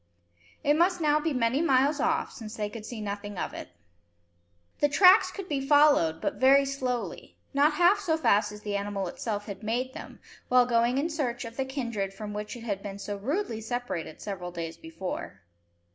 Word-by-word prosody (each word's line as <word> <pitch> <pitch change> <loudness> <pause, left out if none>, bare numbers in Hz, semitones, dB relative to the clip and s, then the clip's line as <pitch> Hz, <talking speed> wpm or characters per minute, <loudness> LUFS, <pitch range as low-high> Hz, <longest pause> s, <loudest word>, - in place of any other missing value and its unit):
It 290 - +4
must 350 +3 +2
now 300 -2 +3
be 315 +1 -1
many 250 +1 +1
miles 285 -1 +3
off, 320 +2 0
since 220 -1 -9
they 210 -2 -3
could 215 0 -8
see 230 -2 -6
nothing 205 -1 -5
of - - -3
it. - - -7 1.1
The 290 - +3
tracks 370 +6 +6
could 390 -2 -7
be 285 -5 -1
followed 285 - +4
but - - -2
very 275 +1 +6
slowly, 255 -3 -4 0.2
not 290 +2 +4
half 355 +6 +4
so 320 -5 0
fast 210 -8 +2
as 210 0 -10
the 205 -1 -3
animal 200 -1 -2
itself 205 +3 -4
had 200 -1 -7
made 245 +4 -2
them, - - -10 0.3
while 250 0 +5
going 240 +1 +2
in 315 +5 0
search 250 -6 -2
of 230 0 -8
the 265 - -1
kindred 235 -8 -3
from 210 +1 -6
which 210 +3 -5
it 235 - -9
had 200 -4 -3
been 200 -1 -6
so 205 0 -5
rudely 235 - -2
separated 225 -9 -4
several 185 -3 -5
days 170 -2 -5
before. 320 - -7
245 Hz, 190 wpm, -28 LUFS, 205-290 Hz, 1.1 s, tracks